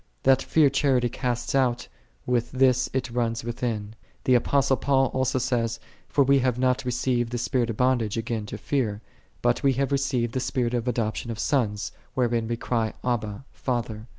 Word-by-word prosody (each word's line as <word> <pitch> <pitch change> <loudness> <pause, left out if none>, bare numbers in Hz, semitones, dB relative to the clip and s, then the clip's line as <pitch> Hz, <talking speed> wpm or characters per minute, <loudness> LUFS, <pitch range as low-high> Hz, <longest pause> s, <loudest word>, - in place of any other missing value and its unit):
That 135 0 +5
fear 150 -4 +3
charity 135 -3 +2
casteth 120 0 -2
out, 130 -3 +1 0.4
with 120 -1 0
this 130 -1 +3
it 130 -2 -2
runneth 115 -1 -1
within. 115 -3 -3 0.3
The 130 - +3
Apostle 135 +2 +3
Paul 135 -1 +2
also 130 0 +1
says, 120 -3 0
" - - -31
For 140 - +3
we 140 +1 +4
have 125 -2 +1
not 130 0 +1
received 125 -1 0
the 120 - -2
spirit 120 0 0
of 110 - -3
bondage 125 -4 +1
again 115 -2 -3
to - - -6
fear; 110 -7 -1 0.4
but 120 0 +2
we 135 -1 +3
have 135 +2 -1
received 135 -4 0
the 130 - 0
spirit 125 -1 -1
of 120 0 -1
adoption 115 -1 -1
of 115 - -4
'sons, 110 -6 0 0.2
wherein 120 -3 +1
we 115 0 -2
cry, 115 -2 -1
Abba, 120 -1 -2
Father."' 115 -3 -3
125 Hz, 180 wpm, -25 LUFS, 115-130 Hz, 0.4 s, That